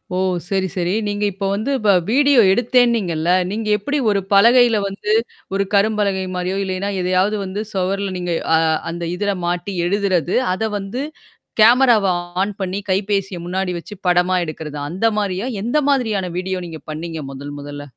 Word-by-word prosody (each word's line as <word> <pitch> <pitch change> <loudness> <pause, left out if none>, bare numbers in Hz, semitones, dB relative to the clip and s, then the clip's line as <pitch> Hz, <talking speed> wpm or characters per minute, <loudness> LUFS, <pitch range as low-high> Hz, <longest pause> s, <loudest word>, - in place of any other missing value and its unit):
ஓ! - - 0 0.3
சரி, 190 -1 0
சரி. 180 0 0
நீங்க 205 0 -2
இப்ப 195 +1 -4
வந்து 220 +7 -2
வ - - +4 0.2
வீடியோ 280 0 +4
எடுத்தேன்னீங்கல்ல, 225 -8 +2 0.2
நீங்க 215 +1 -3
எப்படி 285 +8 -2
ஒரு 200 -1 +2
பலகையில 235 +2 +6
வந்து 200 +2 -4 0.4
ஒரு 200 - +2
கரும்பலகை 200 -2 +2
மாரியோ, 180 +2 -2
இல்லைன்னா 190 +1 -2
எதையாவது 185 +3 +1
வந்து 190 +2 -4
சுவர்ல 195 +1 -1
நீங்க 175 -1 -2 0.2
அ - - +5 0.3
அந்த 170 +1 -5
இதில 205 +2 -1
மாட்டி 175 +3 -2
எழுதுறது, 185 -3 0 0.2
அத 220 +3 -1
வந்து 205 +7 -4 0.6
கேமராவ 235 -2 +6 0.4
ஆன் 205 +2 -1
பண்ணி 190 +1 -2
கைபேசிய 195 -1 0
முன்னாடி 185 +1 -2
வச்சு 170 - -9
படமா 180 +1 +3
எடுக்கறத? 155 -1 -7
அந்த 185 +7 -2
மாரியா? 200 +2 -2 0.2
எந்த 240 +6 0
மாதிரியான 220 -9 +1
வீடியோ 185 0 -2
நீங்க 160 -2 -9
பண்ணீங்க? 160 +1 -5
மொதல் 145 +2 -8
மொதல்ல? 145 0 -8
195 Hz, 155 wpm, -19 LUFS, 180-210 Hz, 0.6 s, பலகையில